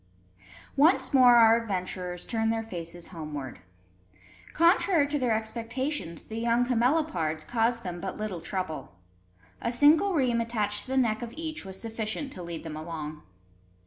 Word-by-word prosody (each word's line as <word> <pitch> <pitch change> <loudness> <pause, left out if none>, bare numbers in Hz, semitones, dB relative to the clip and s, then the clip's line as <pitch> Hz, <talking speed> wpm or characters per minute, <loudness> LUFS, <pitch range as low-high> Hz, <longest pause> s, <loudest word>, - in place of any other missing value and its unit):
Once 305 +2 +4
more 250 -2 +7
our 230 0 +6
adventurers 185 -4 -4
turned 225 -1 0
their 225 0 -1
faces 175 -4 -7
homeward. 150 -6 -6 0.9
Contrary 335 -1 +4
to 295 0 -1
their 245 -4 +2
expectations, 230 - -3
the 220 +1 -6
young 235 +1 +2
camelopards 235 - +1
caused 230 +3 0
them 175 -1 -5
but 190 - -4
little 210 -6 -4
trouble. 165 - -5 0.7
A 235 - -1
single 305 +9 +4
rheim 245 -5 +2
attached 210 -3 -1
to - - -19
the 265 +1 -1
neck 225 -4 +2
of 235 -1 -7
each 315 -1 -4
was 190 0 -7
sufficient 225 +5 -4
to 180 - -8
lead 170 -1 -6
them 160 -2 -6
along. 155 -1 -6
225 Hz, 150 wpm, -28 LUFS, 180-250 Hz, 0.9 s, more